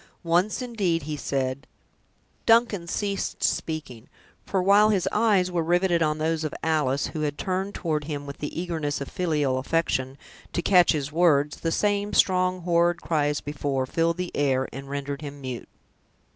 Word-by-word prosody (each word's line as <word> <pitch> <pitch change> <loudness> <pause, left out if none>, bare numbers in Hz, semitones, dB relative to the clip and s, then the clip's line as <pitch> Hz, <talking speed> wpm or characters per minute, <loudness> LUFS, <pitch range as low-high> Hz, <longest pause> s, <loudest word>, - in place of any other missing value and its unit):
Once, 175 +8 +1
indeed, 195 - -1
he 150 +1 -4
said—" 135 -1 -2 0.8
Duncan 225 -6 +4
ceased 200 +2 -2
speaking; 145 -8 -2 0.4
for 190 -2 0
while 205 +3 +6
his 195 -4 +1
eyes 205 -5 +2
were 175 -1 0
riveted 175 +1 +2
on 155 -1 +1
those 160 +1 -1
of 155 - -3
Alice, 150 -4 +1
who 155 - -3
had 145 -1 -2
turned 190 +3 -2
toward 155 -4 -2
him 145 -2 -5
with 140 0 -8
the 150 +2 -4
eagerness 160 -5 -2
of 140 - -6
filial 150 -7 0
affection, 135 -3 -1 0.4
to 170 - -1
catch 180 -3 +5
his 145 -2 -3
words, 150 -3 +3
the 165 - -1
same 205 +2 0
strong, 185 -1 +3
horrid 175 0 +2
cry, 155 -4 0
as 145 0 -1
before, 140 -2 -2
filled 165 +5 0
the 180 -1 -4
air, 135 -2 +1
and 135 +1 -8
rendered 140 0 -4
him 145 -1 -7
mute. 130 -3 -6
165 Hz, 170 wpm, -25 LUFS, 145-180 Hz, 0.8 s, while